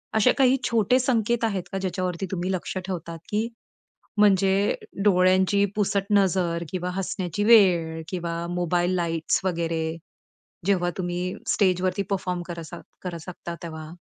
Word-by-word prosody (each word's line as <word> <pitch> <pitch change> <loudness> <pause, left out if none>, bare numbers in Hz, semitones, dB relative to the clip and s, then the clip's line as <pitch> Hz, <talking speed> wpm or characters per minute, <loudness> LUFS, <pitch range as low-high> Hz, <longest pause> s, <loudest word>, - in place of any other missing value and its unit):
असे 220 - +5
काही 265 0 +5
छोटे 235 +3 +3
संकेत 235 -2 +1
आहेत 200 -5 -1
का? 195 - -2
ज्याच्यावरती 185 -1 -2
तुम्ही 185 0 -2
लक्ष 185 0 -3
ठेवतात? 170 -3 -5
की 215 +2 0 0.7
म्हणजे 195 -1 +4 0.3
डोळ्यांची 190 +1 +4
पुसट 200 -1 +1
नजर 180 -4 +2
किंवा 180 -1 -2
हसण्याची 190 0 -2
वेळ 175 -8 +5
किंवा 170 -2 -3
मोबाईल 175 +1 0
लाइट्स 165 -2 0
वगैरे 165 -2 -1 0.7
जेव्हा 180 -3 +2
तुम्ही 180 0 -2
स्टेजवरती 185 0 +2
परफॉर्म 180 -2 -1
करत 175 -1 -6
असाल 160 - -9 0.2
करू 175 -2 -4
शकता 175 -1 -7
तेव्हा? 160 -2 -7
185 Hz, 135 wpm, -25 LUFS, 175-200 Hz, 0.7 s, असे